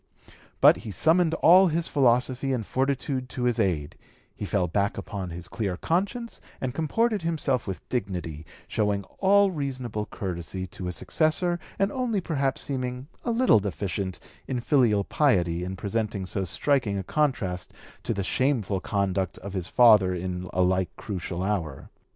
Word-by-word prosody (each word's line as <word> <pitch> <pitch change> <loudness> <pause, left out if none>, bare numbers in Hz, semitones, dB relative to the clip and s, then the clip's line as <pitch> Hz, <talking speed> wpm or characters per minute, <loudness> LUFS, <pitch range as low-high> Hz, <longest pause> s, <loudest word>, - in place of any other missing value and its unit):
But - - +8
he - - -8
summoned 160 - +3
all 185 +3 +8
his 165 0 0
philosophy 130 0 +2
and 115 -4 -2
fortitude 135 0 -1
to 125 -1 -4
his 120 -1 +1
aid; 80 -8 0 0.4
he - - -5
fell 95 -3 0
back 100 +4 0
upon 100 -2 -5
his 85 +1 -7
clear 105 -6 -3
conscience 200 - -2 0.2
and 130 -2 -3
comported 210 - +1
himself 150 -8 -1
with 95 - -6
dignity, 90 -9 -3 0.2
showing 105 -2 0 0.2
all 200 0 +5
reasonable 130 - -3
courtesy 95 0 -5
to 90 0 -8
his 90 -1 -3
successor 175 +2 +1 0.2
and 195 +1 +1
only 245 -6 0
perhaps 140 -6 -1
seeming 130 0 -4
a - - -2
little 235 - +4
deficient 95 -1 -3 0.3
in 125 - -1
filial 120 -6 +3
piety 90 - +1
in 95 +1 -4
presenting 100 0 -2
so 95 +1 -2
striking 115 - +1
a 95 - -3
contrast 100 - -1 0.3
to - - -3
the 100 - -1
shameful 110 -4 0
conduct 95 -2 -1
of 100 0 -8
his 95 -3 -3
father 105 -7 +6
in 90 0 -4
a 90 - +2
like 95 0 +1
crucial 90 -3 -4
hour. 90 -9 -3
110 Hz, 155 wpm, -26 LUFS, 95-145 Hz, 0.4 s, But